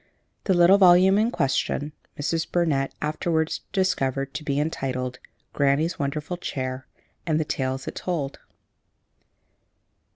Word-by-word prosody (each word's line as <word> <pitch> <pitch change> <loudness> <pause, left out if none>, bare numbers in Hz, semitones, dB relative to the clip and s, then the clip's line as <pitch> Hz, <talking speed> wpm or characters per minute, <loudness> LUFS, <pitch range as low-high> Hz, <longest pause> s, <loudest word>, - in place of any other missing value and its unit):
'" - - -48
The 190 - +3
little 175 +3 +6
volume 185 +1 +6
in 220 +2 +2
question 145 - -1 0.3
Mrs. 160 +3 -1
Burnett 150 -6 +1
afterwards 160 +1 -1
discovered 135 -8 0
to 155 - -5
be 140 -1 -1
entitled 130 -4 -3 0.3
"Granny's 145 +4 +1
Wonderful 150 +5 -3
Chair 130 -5 -4 0.4
and 155 -1 +2
the 155 - 0
Tales 130 -1 -3
it - - -4
Told." 155 -7 -3
150 Hz, 125 wpm, -25 LUFS, 135-175 Hz, 0.4 s, little